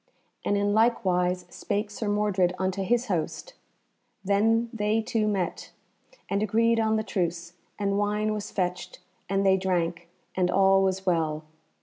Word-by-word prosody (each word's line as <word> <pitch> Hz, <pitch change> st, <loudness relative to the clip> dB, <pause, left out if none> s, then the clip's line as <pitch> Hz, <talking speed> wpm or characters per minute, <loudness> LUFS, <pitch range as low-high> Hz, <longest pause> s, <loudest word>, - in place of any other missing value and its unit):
And 205 Hz, -, +1 dB
in 205 Hz, 0 st, +1 dB
like 225 Hz, 0 st, +2 dB
wise 180 Hz, 0 st, +1 dB
spake 210 Hz, +1 st, -3 dB
Sir 210 Hz, +1 st, -3 dB
Mordred 200 Hz, -4 st, +1 dB
unto 190 Hz, +1 st, -1 dB
his 240 Hz, +5 st, +1 dB
host. 195 Hz, -, -3 dB, 0.7 s
Then 225 Hz, +4 st, +2 dB
they 215 Hz, 0 st, +1 dB
two 225 Hz, -1 st, 0 dB
met, 195 Hz, -4 st, -2 dB, 0.5 s
and 200 Hz, -, -1 dB
agreed 230 Hz, +2 st, +2 dB
on 220 Hz, -1 st, +2 dB
the 220 Hz, -, 0 dB
truce, 170 Hz, -4 st, -3 dB, 0.2 s
and 200 Hz, -1 st, 0 dB
wine 210 Hz, +1 st, 0 dB
was 210 Hz, -1 st, -4 dB
fetched 180 Hz, -1 st, -3 dB, 0.3 s
and 195 Hz, 0 st, +1 dB
they 190 Hz, 0 st, +5 dB
drank, 175 Hz, -2 st, -1 dB, 0.3 s
and 180 Hz, -1 st, +1 dB
all 195 Hz, +1 st, +4 dB
was 190 Hz, 0 st, 0 dB
well. 160 Hz, -4 st, 0 dB
200 Hz, 150 wpm, -26 LUFS, 180-215 Hz, 0.7 s, they